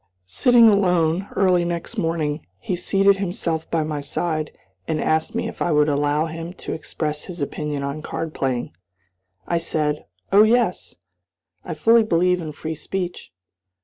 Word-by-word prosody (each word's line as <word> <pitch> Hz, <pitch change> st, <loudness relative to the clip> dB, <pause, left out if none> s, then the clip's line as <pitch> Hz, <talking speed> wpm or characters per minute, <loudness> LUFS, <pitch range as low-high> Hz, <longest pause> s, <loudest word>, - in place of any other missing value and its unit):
Sitting 235 Hz, -, +5 dB
alone, 180 Hz, -3 st, +3 dB
early 180 Hz, -3 st, +3 dB
next 170 Hz, -1 st, -4 dB
morning, 160 Hz, -2 st, -1 dB
he 180 Hz, -, -3 dB
seated 195 Hz, +2 st, +3 dB
himself 175 Hz, -4 st, -2 dB
by 165 Hz, -2 st, +1 dB
my 150 Hz, -1 st, -3 dB
side, 155 Hz, +2 st, -2 dB, 0.4 s
and 160 Hz, -1 st, -1 dB
asked 160 Hz, +1 st, 0 dB
me -, -, -1 dB
if -, -, -9 dB
I 175 Hz, -, +1 dB
would 150 Hz, -1 st, +4 dB
allow 145 Hz, +2 st, +1 dB
him 165 Hz, +2 st, -6 dB
to -, -, -6 dB
express 150 Hz, -1 st, -4 dB
his 180 Hz, -2 st, -8 dB
opinion 145 Hz, 0 st, -3 dB
on 140 Hz, +2 st, -4 dB
card 160 Hz, +1 st, -4 dB
playing. 130 Hz, -3 st, -2 dB, 0.8 s
I 170 Hz, -, +1 dB
said 150 Hz, -2 st, -2 dB, 0.2 s
"Oh, 200 Hz, +2 st, +7 dB
yes! 220 Hz, -3 st, +2 dB, 0.7 s
I 170 Hz, -, -5 dB
fully 225 Hz, +9 st, +5 dB
believe 180 Hz, -3 st, +2 dB
in 155 Hz, -2 st, -5 dB
free 155 Hz, +2 st, -5 dB
speech." 175 Hz, -, -5 dB
165 Hz, 155 wpm, -22 LUFS, 150-180 Hz, 0.8 s, Oh